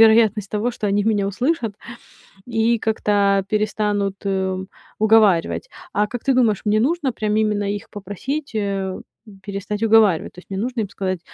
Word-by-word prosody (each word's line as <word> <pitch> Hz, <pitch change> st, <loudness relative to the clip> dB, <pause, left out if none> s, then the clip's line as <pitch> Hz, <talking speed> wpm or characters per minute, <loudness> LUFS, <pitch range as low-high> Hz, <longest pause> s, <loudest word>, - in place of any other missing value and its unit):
вероятность 220 Hz, -2 st, +5 dB
того, 215 Hz, +4 st, 0 dB
что 215 Hz, -3 st, -4 dB
они 205 Hz, +1 st, +2 dB
меня 205 Hz, -3 st, +1 dB
услышат 230 Hz, -, -1 dB, 0.7 s
и 230 Hz, 0 st, +1 dB
как-то 200 Hz, -3 st, +2 dB
перестанут, 210 Hz, -2 st, 0 dB
э, 190 Hz, -1 st, -1 dB, 0.3 s
уговаривать. 215 Hz, -, +3 dB, 0.2 s
А 210 Hz, 0 st, +2 dB
как 245 Hz, +2 st, -6 dB
ты 270 Hz, -, +2 dB
думаешь, 230 Hz, -6 st, +2 dB
мне 215 Hz, +1 st, +3 dB
нужно 285 Hz, +1 st, +1 dB
прям 215 Hz, -1 st, -1 dB
именно 210 Hz, -1 st, +1 dB
их 205 Hz, -, -9 dB
попросить, 220 Hz, +8 st, -5 dB
э, 195 Hz, -2 st, -2 dB, 0.4 s
перестать 205 Hz, +2 st, -4 dB
уговаривать? 215 Hz, -6 st, +4 dB
То -, -, -12 dB
есть 180 Hz, -, -18 dB
мне 195 Hz, 0 st, -3 dB
нужно 240 Hz, +1 st, -2 dB
им 200 Hz, -, -3 dB
сказать: 185 Hz, -2 st, -3 dB
210 Hz, 160 wpm, -21 LUFS, 200-225 Hz, 0.7 s, вероятность